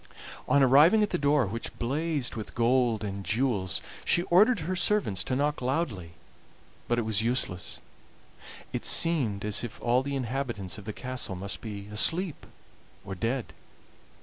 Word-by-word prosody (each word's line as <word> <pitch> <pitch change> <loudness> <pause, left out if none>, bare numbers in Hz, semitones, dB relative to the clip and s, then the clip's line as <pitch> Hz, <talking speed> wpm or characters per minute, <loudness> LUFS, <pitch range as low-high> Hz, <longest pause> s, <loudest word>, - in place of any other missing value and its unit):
On 140 - +5
arriving 150 - +6
at 210 - -1
the - - 0
door, 145 -2 +3
which 115 +4 -6
blazed 145 +2 -1
with 110 -2 -7
gold 120 -2 +2
and 100 -1 -5
jewels, 110 -5 0 0.2
she 175 - +2
ordered 210 +3 +5
her 180 +4 -2
servants 190 - +1
to 130 - -1
knock 145 +2 0
loudly, 125 - -2 0.7
but 120 - +1
it 120 - +1
was 110 -1 0
useless; 115 -6 -2 1.0
it - - -3
seemed 125 -12 +3
as 105 +2 0
if 120 - -7
all 125 +1 +2
the 140 +1 -4
inhabitants 120 -7 -3
of 100 - -12
the 110 - -4
castle 130 -6 -4
must 100 +2 -5
be 100 -3 -7
asleep 165 - +1 0.6
or 95 - -5
dead. 115 +6 -3
125 Hz, 155 wpm, -28 LUFS, 105-145 Hz, 1.0 s, arriving